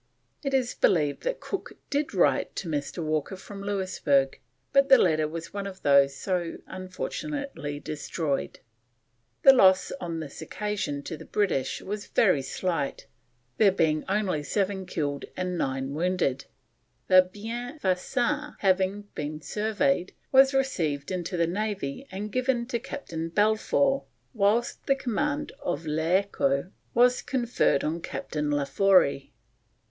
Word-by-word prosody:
It 275 -2 -1
is 255 -2 +1
believed 150 -6 +2
that - - -1
Cook 395 - -5 0.2
did 290 0 0
write 145 -9 +2
to 190 - -4
Mr. 155 +2 -3
Walker 155 +4 -1
from 195 +1 -10
Louisburg, 185 -9 +1 0.3
but 275 0 +5
the 265 - +9
letter 155 -3 +3
was 165 +1 -7
one 200 -1 -3
of 190 -1 -10
those 140 -1 +5
so 175 -2 -2
unfortunately 185 - -5
destroyed. 150 -1 -3 0.8
The 270 - +10
loss 190 -7 +5
on 170 -2 -3
this 150 -1 -8
occasion 175 -5 -3
to 160 - -5
the - - -11
British 195 -11 -1
was 205 +1 -5
very 185 -10 +3
slight, 165 0 -2 0.5
there 205 -3 +6
being 160 -4 +1
only 195 -6 0
7 190 +3 -1
killed 145 -3 -2
and 180 -1 -2
9 135 -3 -2
wounded. 170 -5 0 0.6
The 185 0 +8
Bienfaisant 240 +5 -2
having 195 +1 +1
been 150 +1 -4
surveyed, 215 - 0 0.2
was 270 0 +7
received 175 - -1
into 180 0 -3
the 170 - +3
Navy 200 - -3
and 205 +3 -5
given 255 -1 0
to 235 - -1
Captain 165 - -5
Balfour 220 +8 +2 0.3
whilst 220 +2 +1
the 275 - +4
command 290 +4 -2
of 280 - -3
L'Echo 160 -1 +1 0.2
was 245 +1 +5
conferred 235 - +1
on 165 +2 -2
Captain 150 -2 -3
Laforey. 145 0 +3
185 Hz, 130 wpm, -27 LUFS, 155-235 Hz, 0.8 s, The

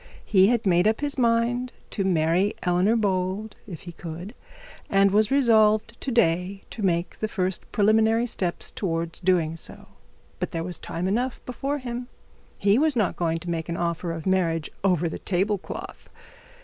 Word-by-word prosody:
He 190 -2 +5
had 235 -1 +1
made 175 +1 +4
up 220 +4 +1
his 290 -2 -2
mind 240 +1 +2 0.2
to 200 - -1
marry 180 +2 +2
Eleanor 180 +5 +3
Bold 200 0 -1
if 175 -6 -8
he 175 - -8
could, 170 +5 -8 0.6
and 195 0 +4
was 210 +1 +3
resolved 225 -4 +4
to - - -3
day 190 -3 +1
to 225 - -7
take 175 -3 0
the 215 - -1
first 185 -3 -3
preliminary 220 +2 +3
step 185 -7 -3
towards 165 -3 -2
doing 175 -3 +2
so. - - -10 0.5
But - - -2
there 165 -1 -2
was 175 0 -5
time 170 +3 -3
enough 240 +6 -1
before 275 +3 -2
him. 245 -2 -5 0.5
He 205 +4 +3
was 305 -2 +2
not 215 -5 +1
going 165 -1 0
to 175 - -6
make 165 -1 -3
an 170 - -2
offer 170 0 -2
of 165 -1 -6
marriage 170 -4 +1
over 180 -4 +2
the 160 - -5
table 195 +2 0
cloth. - - -8
195 Hz, 175 wpm, -25 LUFS, 175-225 Hz, 0.6 s, He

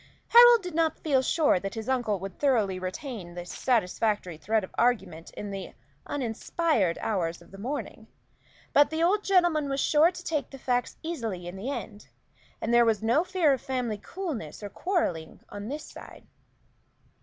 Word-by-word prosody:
Harold 475 -2 +8
did 360 -2 -6
not 325 0 +1
feel 275 -5 +2
sure 295 - +2
that 195 +3 -5
his 225 -1 -5
uncle 245 -6 0
would 195 0 -8
thoroughly 220 -10 +2
retain 185 - -6
this 175 0 -7
satisfactory 210 -5 0
thread 215 +6 0
of 185 - -9
argument 190 -9 0
in 205 -1 -5
the 195 -2 -7 0.3
uninspired 235 - 0
hours 170 -6 -1
of 170 +1 -19
the 195 - -11
morning; 265 +8 -5 0.7
but 290 0 +6
the 320 +1 -1
old 400 +4 +3
gentleman 350 -6 +3
was 275 0 -1
sure 310 +4 +4
to 355 -1 -9
take 305 -4 -2
the 270 - -10
facts 245 -1 -1
easily 230 - -4
in 175 - -7
the 205 +7 -5
end, 210 -7 -6 0.5
and 235 - -1
there 240 0 +7
was 225 -2 +1
no 235 +9 +3
fear 360 -6 +2
of 265 - -3
family 245 -5 -2
coolness 255 - -6
or 205 - -5
quarrelling 255 - -2
on 205 0 -7
this 295 +4 -5
side. - - -12
240 Hz, 175 wpm, -27 LUFS, 195-305 Hz, 0.7 s, Harold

